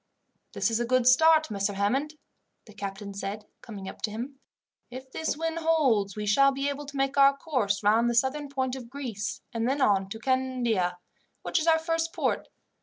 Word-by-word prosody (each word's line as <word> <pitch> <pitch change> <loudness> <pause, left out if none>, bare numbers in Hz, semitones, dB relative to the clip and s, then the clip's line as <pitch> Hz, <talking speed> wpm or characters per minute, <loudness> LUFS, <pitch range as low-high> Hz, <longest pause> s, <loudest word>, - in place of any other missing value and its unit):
"This - - 0
is 225 - +1
a 240 - 0
good 255 0 +2
start, 315 +2 +5
Messer 200 0 -1
Hammond," 265 +10 0 0.5
the 215 - -15
captain 200 0 -6
said, 200 +2 -5 0.2
coming 200 -4 -8
up - - -9
to - - -1
him. 250 +6 -6 0.5
"If 260 +1 -10
this 320 0 -2
wind 325 +1 -2
holds, 265 - +2
we 210 - -3
shall 275 +7 +5
be 275 +1 -1
able 285 0 -5
to 285 0 -7
make 270 +1 0
our 275 0 +6
course 245 -10 -1
round 225 +3 +4
the 240 - -1
southern 275 +4 +1
point 260 -2 -2
of 245 -3 -9
Greece, 240 -6 -5
and 230 +1 0
then 275 +2 0
on 195 -7 +2
to 220 - -6
Candia, 240 -7 0 0.5
which - - +1
is 315 - -3
our 325 -1 +6
first 330 0 -1
port. - - -1
255 Hz, 195 wpm, -27 LUFS, 210-280 Hz, 0.5 s, our